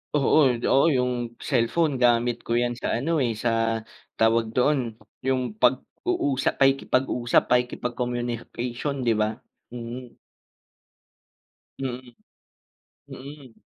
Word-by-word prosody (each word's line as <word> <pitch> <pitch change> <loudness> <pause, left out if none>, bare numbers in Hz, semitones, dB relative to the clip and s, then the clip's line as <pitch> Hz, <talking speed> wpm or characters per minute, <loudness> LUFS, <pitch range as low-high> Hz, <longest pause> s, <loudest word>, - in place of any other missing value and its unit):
Oo, 150 +2 +4 0.2
oo, 135 - +4
'yung 125 -1 +1 0.4
cellphone 145 +5 +2
gamit 120 0 +3
ko - - -4
'yan 120 0 0
sa - - -2
ano, 150 +7 -2
eh, 120 - 0
sa 120 - +2 0.7
tawag 115 +1 +3
doon, 145 +4 +3 0.5
'yung 130 -1 +2 0.2
pag-uusap, 135 - +1
pakikipag-usap, 135 -2 +2
pakikipag-communication, 125 +1 -2
'di - - +5
ba? 105 - +3 0.4
Mm. 120 +1 -8 1.6
Mm, 125 -2 -6 0.9
mm. 140 -2 -11
125 Hz, 95 wpm, -25 LUFS, 120-135 Hz, 1.6 s, di